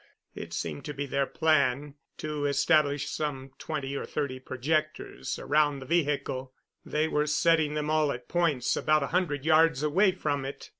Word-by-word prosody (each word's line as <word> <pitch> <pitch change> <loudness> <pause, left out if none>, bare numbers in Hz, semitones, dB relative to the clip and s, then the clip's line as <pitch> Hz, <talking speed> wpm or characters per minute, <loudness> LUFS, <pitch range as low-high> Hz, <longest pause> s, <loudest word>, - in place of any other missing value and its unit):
It - - -8
seemed 80 -3 -4
to 150 - -5
be 145 +1 -3
their 140 0 0
plan 145 -3 +1 0.2
to 150 -1 -2
establish 145 -1 +2
some 135 -4 -4
twenty 140 -3 -4
or - - -3
thirty 135 -3 -3
projectors 145 - -2
around 145 0 +2
the 135 - -9
vehicle; 140 -5 -1 0.3
they 155 +1 0
were 150 -1 0
setting 150 0 +2
them 150 0 -1
all 155 -2 +2
at 120 -1 -7
points 165 -8 +1
about 155 -1 +2
a - - -2
hundred 150 -6 0
yards 160 -3 +4
away 185 +6 +3
from 145 -6 -2
it. 135 +1 -7
150 Hz, 165 wpm, -28 LUFS, 135-155 Hz, 0.3 s, yards